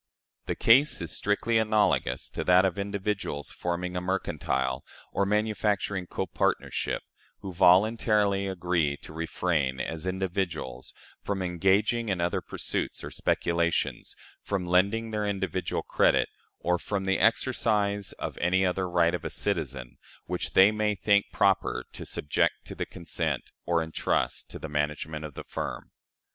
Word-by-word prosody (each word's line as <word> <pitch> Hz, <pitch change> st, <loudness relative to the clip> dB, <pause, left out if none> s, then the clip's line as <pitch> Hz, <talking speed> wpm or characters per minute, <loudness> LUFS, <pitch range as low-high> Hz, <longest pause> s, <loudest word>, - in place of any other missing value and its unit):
The -, -, -1 dB
case 135 Hz, +6 st, +5 dB
is 85 Hz, -1 st, -4 dB
strictly 110 Hz, +3 st, +1 dB
analogous 105 Hz, -, +2 dB
to -, -, -3 dB
that 90 Hz, +1 st, +6 dB
of 95 Hz, 0 st, -1 dB
individuals 100 Hz, -6 st, -3 dB
forming 90 Hz, +1 st, -3 dB
a 90 Hz, -, -1 dB
mercantile 65 Hz, -8 st, -1 dB, 0.3 s
or 100 Hz, -, +1 dB
manufacturing 105 Hz, -3 st, 0 dB
copartnership, 95 Hz, -1 st, -1 dB, 0.4 s
who 95 Hz, -2 st, -6 dB
voluntarily 100 Hz, +2 st, +4 dB
agree 85 Hz, -6 st, 0 dB
to 80 Hz, -, -11 dB
refrain, 80 Hz, -4 st, -1 dB
as 80 Hz, +6 st, -4 dB
individuals, 90 Hz, -9 st, -3 dB, 0.3 s
from 100 Hz, -2 st, -2 dB
engaging 95 Hz, +6 st, +2 dB
in 95 Hz, -2 st, 0 dB
other 85 Hz, +1 st, 0 dB
pursuits -, -, -3 dB
or -, -, -6 dB
speculations, 85 Hz, -1 st, 0 dB, 0.3 s
from 100 Hz, -3 st, -2 dB
lending 100 Hz, +6 st, +2 dB
their 105 Hz, -1 st, -1 dB
individual 95 Hz, -2 st, -2 dB
credit, -, -, +3 dB, 0.3 s
or 90 Hz, 0 st, +1 dB
from 100 Hz, 0 st, -3 dB
the 95 Hz, 0 st, +1 dB
exercise 105 Hz, -3 st, +2 dB
of -, -, -6 dB
any 95 Hz, +2 st, +2 dB
other 90 Hz, 0 st, 0 dB
right 85 Hz, -1 st, +3 dB
of 90 Hz, -, -3 dB
a -, -, -3 dB
citizen, 70 Hz, -11 st, -2 dB, 0.3 s
which 90 Hz, 0 st, -3 dB
they 95 Hz, +2 st, +7 dB
may 105 Hz, -1 st, 0 dB
think 100 Hz, +2 st, +3 dB
proper 100 Hz, -2 st, +2 dB
to -, -, -7 dB
subject 75 Hz, -, 0 dB
to -, -, -7 dB
the -, -, -4 dB
consent, 85 Hz, -, -3 dB, 0.2 s
or 85 Hz, -1 st, +2 dB
intrust 80 Hz, 0 st, -1 dB
to -, -, -7 dB
the -, -, -6 dB
management 75 Hz, +1 st, -2 dB
of 75 Hz, -2 st, -7 dB
the -, -, -6 dB
firm. -, -, -5 dB
95 Hz, 145 wpm, -28 LUFS, 85-100 Hz, 0.4 s, they